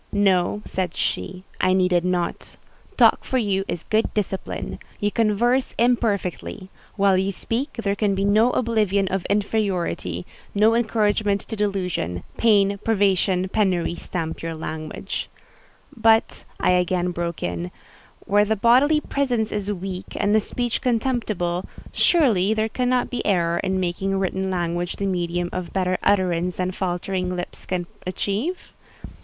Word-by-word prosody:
"No," 200 0 +2
said 185 -2 -3
she, 185 0 -2 0.2
"I 185 0 +3
needed 180 -2 +3
not. 180 -1 -2 0.4
Talk - - +5
for 260 - -1
you 200 -5 +1
is 170 - -4
good 220 +1 +1
discipline. 195 -2 -3 0.2
You 205 0 0
converse 235 +4 +1
imperfectly. 210 -5 0 0.2
While 195 -2 +3
you 190 +1 0
speak, 235 - -3
there 200 -4 -1
can 205 -2 +1
be 195 +1 0
no 215 +4 +4
oblivion 215 -6 +1
of 190 -1 -2
inferiority—no 200 - 0
encouragement 210 -3 +1
to 225 - -6
delusion: 185 - -2
pain, 200 -3 +3
privation, 190 -3 +2
penury 185 -5 +1
stamp 165 -2 -4
your 165 0 -4
language…." 155 -1 -5 0.7
"But," 225 -1 +3
I - - +3
again 180 0 +1
broke 170 -1 -4
in, 90 0 -3 0.6
"where 205 +1 +4
the 220 +1 +1
bodily 260 +8 +4
presence 245 -8 -1
is 205 -1 -2
weak 185 -1 -6
and 205 +1 +2
the 220 - +6
speech 240 +2 -2
contemptible, 220 -8 -1 0.2
surely 220 - +3
there 220 0 0
cannot 250 +1 0
be 245 - -2
error 170 -3 +1
in 190 0 0
making 190 +2 -1
written 190 0 -1
language 175 -1 -2
the 200 - -3
medium 175 -2 -1
of 185 -2 -4
better 185 -1 0
utterance 180 -2 +1
than 185 0 -1
faltering 180 0 -2
lips 175 0 -7
can 180 -1 -1 0.2
achieve?" 210 - -2
195 Hz, 140 wpm, -23 LUFS, 180-220 Hz, 0.7 s, the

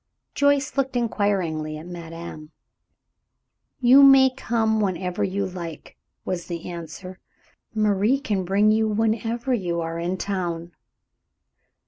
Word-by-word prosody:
Joyce 285 -1 +1
looked 270 -1 0
inquiringly 185 -10 -1
at 155 - -10
madame. 165 -2 -8 1.3
"You 260 +2 +7
may 270 -1 +7
come 220 -3 0
whenever 185 -2 -1
you 195 +1 -1
like," 170 -4 -8 0.3
was 175 -2 -3
the 170 -2 -6
answer. 175 +2 -8 0.6
"Marie 215 +4 +2
can 205 -8 -1
bring 200 +4 +3
you 220 0 +2
whenever 225 +3 0
you 175 -7 -1
are 165 0 -3
in 175 +2 -2
town." 175 -4 -3
195 Hz, 115 wpm, -24 LUFS, 170-225 Hz, 1.3 s, You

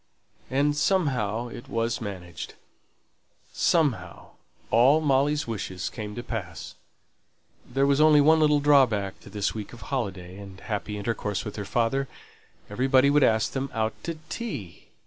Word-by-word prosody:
And 145 +3 +2
"somehow" 125 - 0
it 120 - -10
was 115 0 -1
managed. 90 -5 -7 1.0
"Somehow" 110 - 0 0.4
all 130 +7 +5
Molly's 145 0 +2
wishes 95 -4 -4
came 105 -2 -6
to 120 - -5
pass; 90 - -6 1.0
there 135 +2 +2
was 140 +1 +3
only 155 -1 +7
one 160 +2 +5
little 150 -1 +4
drawback 125 -10 +3
to - - -14
this 105 -2 -1
week 110 0 -7
of 120 - -11
holiday 95 -7 -3
and 95 -2 -10
happy 105 -1 -4
intercourse 105 -1 -2
with 105 - -6
her 105 - -5
father. 120 +6 0 0.6
Everybody 130 +2 +3
would 145 0 +4
ask 110 -3 +3
them 135 0 -3
out 110 0 0
to 165 -1 -4
tea. 140 - -6
120 Hz, 145 wpm, -26 LUFS, 105-140 Hz, 1.0 s, only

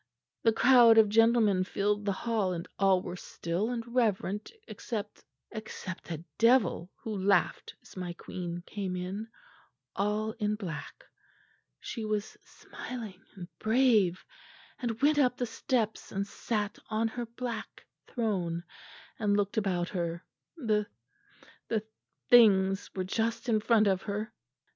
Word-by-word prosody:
The 225 - +4
crowd 235 0 +7
of 220 -2 +7
gentlemen 225 -3 +4
filled 205 +2 -1
the 200 - +2
hall 205 -2 0
and 170 -1 -5
all 195 -2 +4
were 180 - -5
still 180 +3 -3
and 240 -2 -2
reverent 215 -4 0 0.2
except 210 -3 -6 0.3
except 215 -5 -7
a 165 0 -5
devil 230 -7 +4
who 220 -2 -3
laughed 195 -1 +1
as - - -16
my 180 -2 -4
queen 175 0 -6
came 195 -3 -4
in, 190 +5 -4 0.7
all 210 +2 0
in 210 -1 +1
black. 180 -8 -7 0.7
She 230 - -5
was 215 -1 -2
smiling 220 -7 -8
and 180 -3 -8
brave, 220 -6 +3 0.5
and 230 -3 -3
went 295 0 +5
up 250 -3 +3
the 245 - 0
steps 225 -1 -2
and 195 0 -1
sat 210 0 -3
on 220 +1 +1
her 240 +1 -5
black 235 -1 -6 0.2
throne 180 -8 -1 0.6
and 205 -2 +2
looked 205 -1 0
about 185 -4 0
her. 170 -2 -3 0.3
The 215 -7 0 0.8
the 220 -2 0 0.4
things 195 -5 +5
were 185 - -1
just 225 +5 -1
in 220 -2 +3
front 220 -1 +4
of 190 -2 +2
her. 210 +1 -4
210 Hz, 135 wpm, -30 LUFS, 190-225 Hz, 0.8 s, crowd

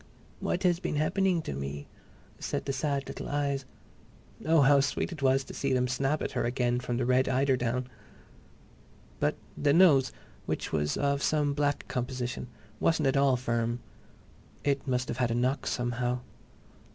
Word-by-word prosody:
"What 180 - -1
has 175 -2 +3
been 170 - -2
happening 175 +3 +1
to - - -4
me?" 70 +1 -5 0.5
said - - -3
the 135 - -1
sad 140 -1 -1
little - - -6
eyes. 140 -2 -1 0.8
Oh, 160 -1 +5
how 140 +1 +6
sweet 140 +6 0
it 160 -4 -7
was 135 0 +3
to - - -10
see 135 -1 -1
them 125 0 +2
snap 135 +4 0
at - - -2
her 125 - -1
again 120 0 0
from 120 -1 -3
the 125 - 0
red 130 +1 +3
eiderdown!... 130 -2 +1 1.3
But - - +1 0.2
the 145 -1 +2
nose, 150 -7 +6 0.4
which - - -2
was 75 -1 0
of 140 0 +1
some 150 -1 +1
black 145 0 0
composition, 125 0 -3 0.3
wasn't 155 -4 +2
at 135 - 0
all 140 -2 +4
firm. 120 -1 -1 0.8
It 140 0 0
must 125 -1 0
have - - -4
had 125 -2 +1
a 115 - 0
knock, 130 +3 0
somehow. 120 0 -1
135 Hz, 165 wpm, -29 LUFS, 125-145 Hz, 1.3 s, how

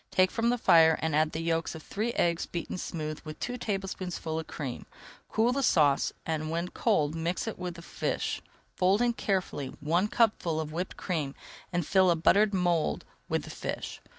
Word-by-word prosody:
Take 185 0 +3
from 230 +1 +1
the 245 - +2
fire, 160 -7 +6
and 160 -2 0
add 155 0 +3
the 160 - -3
yolks 165 -1 0
of 160 - -9
three 220 +4 -2
eggs 170 -5 +1
beaten 175 +1 -4
smooth 155 -3 -4
with 155 -1 -8
two 245 - -3
[Page 245 - -6
285] 195 -2 -2
tablespoonfuls 165 -3 -3
of 160 - -6
cream. 135 -5 -5 0.4
Cool 225 +3 +2
the 275 +2 0
sauce, 150 - +3
and 155 -1 -2
when 170 +2 -2
cold 155 -11 +1
mix 170 +7 -2
it 225 - -4
with 180 -2 -4
the 170 - -10
fish. - - -2 0.3
Fold 195 +5 +3
in 240 -1 +2
carefully 185 -10 -1
one 170 +7 +1
cupful 210 -8 +2
of 155 -1 -3
whipped 175 +4 -4
cream 155 -7 -2 0.4
and 175 -3 0
fill 190 +1 +4
a 170 - +4
buttered 200 +6 +4
mould 175 -4 +1 0.2
with - - 0
the - - -8
fish. - - -5
170 Hz, 200 wpm, -29 LUFS, 160-195 Hz, 0.4 s, fire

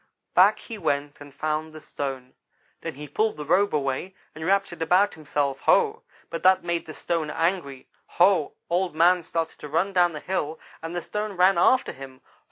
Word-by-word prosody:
"Back - - +6
he 225 -3 -9
went 145 -3 -2
and 145 0 -11
found 155 +2 -3
the 155 - -9
stone. 135 -4 -5 0.5
Then - - -5
he 150 +2 -8
pulled 215 +7 0
the 150 - -6
robe 195 +6 +3
away, 140 +6 -2 0.2
and 155 - -8
wrapped 195 +1 +1
it 170 - -11
about 180 +5 +3
himself. 145 -3 -2
Ho! - - +3 0.3
but 165 - -4
that 185 0 +4
made 170 -1 -2
the 155 - -7
stone 165 -3 -2
angry 165 -5 -2 0.3
Ho! 180 -4 +4
Old 175 -1 0
man 175 +2 +4
started 165 -1 -3
to 150 - -8
run 175 +6 0
down 175 -2 +3
the 150 - -5
hill, 160 -3 -3 0.2
and 165 +2 -6
the 175 - -3
stone 210 0 -4
ran 185 0 +4
after 255 +8 +3
him. 130 -1 -11
165 Hz, 190 wpm, -25 LUFS, 150-185 Hz, 0.5 s, Back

